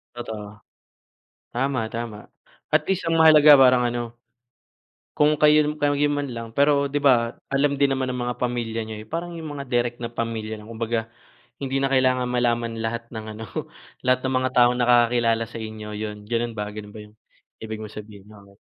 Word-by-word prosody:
Totoo. 105 Hz, -3 st, -8 dB, 0.9 s
Tama, 125 Hz, -3 st, -1 dB
tama, 115 Hz, -3 st, -7 dB, 0.4 s
at 155 Hz, 0 st, +3 dB
least 190 Hz, -1 st, 0 dB
ang 165 Hz, -, +2 dB
mahalaga 155 Hz, -2 st, +8 dB
parang 125 Hz, -1 st, +6 dB
ano, 120 Hz, -1 st, -4 dB, 1.0 s
kung 150 Hz, +1 st, +4 dB
kayo, 150 Hz, 0 st, +5 dB, 0.2 s
kayo 145 Hz, 0 st, +2 dB, 0.2 s
man 145 Hz, -1 st, -2 dB
lang 115 Hz, -1 st, -6 dB
pero 140 Hz, +1 st, +3 dB
di 145 Hz, +1 st, -2 dB
ba 120 Hz, -4 st, +3 dB, 0.2 s
alam 140 Hz, +1 st, +2 dB
din 140 Hz, 0 st, +2 dB
naman 135 Hz, -1 st, 0 dB
ng 125 Hz, -, -4 dB
mga 120 Hz, -1 st, -3 dB
pamilya 120 Hz, -2 st, -2 dB
niyo, 110 Hz, -1 st, -7 dB
eh, 110 Hz, -, -13 dB
parang 170 Hz, +1 st, -4 dB
yung 165 Hz, -2 st, -7 dB
mga 140 Hz, -, -5 dB
direct 120 Hz, -2 st, -1 dB
na 120 Hz, 0 st, -6 dB
pamilya 110 Hz, -2 st, -4 dB
lang 105 Hz, -, -13 dB
kumbaga, 115 Hz, 0 st, -3 dB, 0.5 s
hindi 135 Hz, 0 st, -1 dB
na 135 Hz, -, +1 dB
kailangan 130 Hz, -2 st, +2 dB
malaman 120 Hz, -2 st, -1 dB
lahat 115 Hz, +1 st, -3 dB
ng 110 Hz, -1 st, -6 dB
ano, 110 Hz, -, -7 dB, 0.6 s
lahat 130 Hz, +1 st, +1 dB
ng 130 Hz, -, -1 dB
mga 130 Hz, 0 st, +1 dB
taong 120 Hz, 0 st, +6 dB
nakakakilala 120 Hz, -1 st, +3 dB
sa 115 Hz, 0 st, -9 dB
inyo, 110 Hz, -1 st, -7 dB
yun, 105 Hz, 0 st, -5 dB
ganun 120 Hz, +1 st, -1 dB
ba 105 Hz, -, -2 dB
ganun 105 Hz, -1 st, -8 dB
ba -, -, -9 dB
yung 105 Hz, -, -21 dB, 0.5 s
ibig 110 Hz, -1 st, -5 dB
mong 110 Hz, -1 st, -9 dB
sabihin 105 Hz, -2 st, -11 dB
na 105 Hz, -1 st, -15 dB
ano? 100 Hz, 0 st, -21 dB
120 Hz, 185 wpm, -23 LUFS, 110-135 Hz, 1.0 s, mahalaga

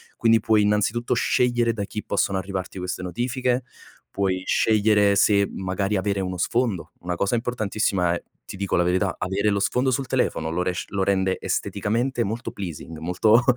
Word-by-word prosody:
quindi 115 Hz, -1 st, +4 dB
puoi 110 Hz, -2 st, +3 dB
innanzitutto 105 Hz, +3 st, +1 dB
scegliere 120 Hz, -2 st, +2 dB
da 105 Hz, -, -3 dB
chi 105 Hz, +1 st, -5 dB
possono 100 Hz, -2 st, 0 dB
arrivarti 95 Hz, -1 st, -4 dB
queste 90 Hz, 0 st, -4 dB
notifiche, 125 Hz, +6 st, -1 dB, 0.5 s
puoi 95 Hz, -2 st, -1 dB
scegliere 105 Hz, -2 st, +3 dB
se 100 Hz, 0 st, +4 dB
magari 95 Hz, +2 st, -1 dB
avere 100 Hz, +1 st, -1 dB
uno 90 Hz, -1 st, -3 dB
sfondo. 115 Hz, -1 st, -1 dB
Una 90 Hz, 0 st, -3 dB
cosa 100 Hz, +6 st, 0 dB
importantissima 105 Hz, -6 st, 0 dB
è, 85 Hz, -, -4 dB, 0.2 s
ti -, -, -8 dB
dico 100 Hz, 0 st, -1 dB
la 90 Hz, -, +3 dB
verità, 90 Hz, +1 st, +1 dB
avere 100 Hz, +3 st, 0 dB
lo 100 Hz, -, +1 dB
sfondo 125 Hz, +6 st, +1 dB
sul 135 Hz, +1 st, -1 dB
telefono, 100 Hz, -11 st, 0 dB
lo 90 Hz, +2 st, -1 dB
resc 90 Hz, 0 st, -3 dB
lo 100 Hz, -1 st, 0 dB
rende 95 Hz, -1 st, +1 dB
esteticamente 115 Hz, +5 st, -1 dB
molto 115 Hz, +4 st, -4 dB
pleasing, 85 Hz, -4 st, -7 dB
molto 105 Hz, +8 st, +3 dB
100 Hz, 170 wpm, -24 LUFS, 95-115 Hz, 0.5 s, quindi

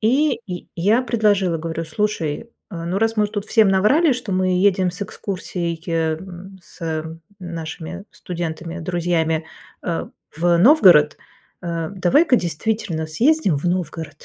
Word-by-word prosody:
И 255 Hz, +2 st, +2 dB
я 180 Hz, -2 st, -6 dB
я 210 Hz, +9 st, +2 dB
предложила, 205 Hz, -7 st, +1 dB
говорю, 165 Hz, +1 st, -4 dB
слушай, 190 Hz, +1 st, -2 dB, 0.2 s
а, 170 Hz, -2 st, -6 dB
ну, 185 Hz, +3 st, -1 dB
раз 225 Hz, 0 st, +1 dB
мы 210 Hz, -, +3 dB
уже 205 Hz, -, -4 dB
тут 205 Hz, -2 st, -3 dB
всем 220 Hz, -3 st, +4 dB
наврали, 255 Hz, -, +4 dB
что 240 Hz, -5 st, -4 dB
мы 185 Hz, -1 st, +1 dB
едем 185 Hz, -2 st, +3 dB
с 180 Hz, +3 st, -6 dB
экскурсией, 175 Hz, -4 st, -4 dB
м, 175 Hz, +4 st, -3 dB
с, 170 Hz, -, -18 dB
э, 160 Hz, -1 st, -2 dB, 0.3 s
нашими 170 Hz, +1 st, -7 dB
студентами, 170 Hz, 0 st, -5 dB
друзьями, 165 Hz, -2 st, 0 dB, 0.4 s
а, 170 Hz, -2 st, -3 dB, 0.3 s
в 170 Hz, +2 st, +2 dB
Новгород. 180 Hz, -, +6 dB, 0.4 s
А 170 Hz, 0 st, -3 dB
давай-ка 245 Hz, -, +3 dB
действительно 170 Hz, -1 st, -2 dB
съездим 225 Hz, -, +2 dB
в 150 Hz, -, -9 dB
Новгород. 170 Hz, -3 st, -3 dB
180 Hz, 145 wpm, -21 LUFS, 165-210 Hz, 0.4 s, Новгород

